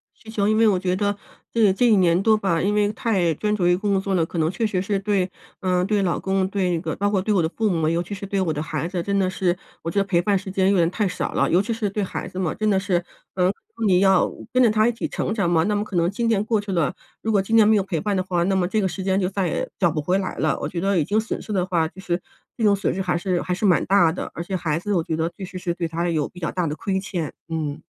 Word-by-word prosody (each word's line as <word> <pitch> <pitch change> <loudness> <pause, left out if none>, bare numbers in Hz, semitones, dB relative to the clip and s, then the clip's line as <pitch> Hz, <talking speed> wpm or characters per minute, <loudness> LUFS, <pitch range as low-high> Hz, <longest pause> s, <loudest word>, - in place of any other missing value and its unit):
需 - - -23
求， 205 -2 0
因 215 - +2
为 225 0 +5
我 190 -3 +3
觉 185 -1 0
得 205 +1 0 0.4
这 220 -4 +4
这 245 +6 +1
1 215 -3 +5
年 175 -2 +4
多 220 -1 +5
吧， 190 -6 0
因 200 +4 +1
为 210 0 +2
太 190 -8 +1
专 210 +4 0
注 175 -4 +1
于 175 - +4
工 200 -1 0
作 195 0 -1
了， 165 -3 +2
可 170 - -5
能 160 0 +2
确 195 +5 -1
实 190 -4 0
是 200 +1 -1
对 195 -2 0 0.3
嗯， 180 -1 +1
对 210 -1 +1
老 175 -4 0
公， 190 -1 0
对 190 -2 0
那 170 - 0
个 - - -3
包 205 +1 0
括 195 - +1
对 210 +3 -1
我 185 -5 +3
的 160 - 0
父 220 +3 -1
母， 165 -4 +1
尤 165 +1 +1
其 180 +4 -6
是 200 0 -7
对 195 0 -1
我 170 - 0
的 150 0 -3
孩 155 +1 -3
子， 175 -2 -3
真 200 0 0
的 185 -1 +2
是 185 -1 0 0.3
我 165 - -3
觉 200 - +1
得 - - +3
陪 180 -3 +2
伴 195 +3 +2
时 195 0 -8
间 190 0 +2
有 200 - +3
点 170 -1 +3
太 200 +3 0
少 180 - -3
了。 - - +2
尤 180 +3 +4
其 230 - -4
是 220 -2 -2
对 210 0 -1
孩 185 - -4
子 185 0 -7
嘛， 175 -4 -1
真 215 - -1
的 195 -2 +3
是 190 -2 0 0.4
嗯， 185 +1 +2 0.2
那 230 - -1
你 185 -2 +4
要 190 -2 +4 0.2
跟 255 0 +4
着 230 - +5
他 215 +1 +3
一 - - +3
起 230 - -3
成 - - -3
长 200 -6 0
嘛， 165 -2 +3
那 210 +1 +1
么 205 - 0
可 210 - -8
能 170 0 +2
今 230 +4 -2
年 210 -3 +2
过 220 -1 +1
去 205 -1 -5
了 170 -1 0 0.3
如 220 - -1
果 205 - +3
今 210 +4 0
年 215 -2 +6
没 220 - +5
有 200 - +2
陪 175 -4 -2
伴 205 -1 0
的 185 - 0
话， 180 -2 -1
那 195 +1 +1
么 180 -2 +1
这 215 +2 0
个 190 - +1
时 190 +1 -5
间 190 0 +1
就 180 - 0
再 195 -2 -1
也 - - -2
找 175 -4 +2
不 150 - -2
回 180 +6 +1
来 190 -2 -3
了， - - +1
我 - - -2
觉 175 - -4
得 195 -1 +1
已 155 - +3
经 210 +7 +1
损 220 - -3
失 - - -8
的 185 - +1
话 165 -3 +1
就 190 - -15
是 175 -2 -1 0.4
这 230 - -2
种 205 -2 +5
损 200 - -1
失 190 - -3
还 180 -2 0
是 175 0 0
还 180 - -2
是 190 - -5
蛮 185 -5 +4
大 175 -4 +4
的， 180 - -5
而 170 - -5
且 190 +1 -4
孩 160 -3 -1
子 205 +3 -4
我 170 - +1
觉 160 -2 -2
得 160 +1 0
必 195 - -8
须 185 0 -8
是 175 -1 -2
对 170 -2 -2
他 170 +2 -2
有 155 -4 0
比 180 - -13
较 170 - -2
大 180 -2 -1
的 150 -1 -2
亏 190 +4 -2
欠， 175 -6 -4 0.2
嗯。 155 -3 -3
190 Hz, 345 characters per minute, -23 LUFS, 175-205 Hz, 0.4 s, 年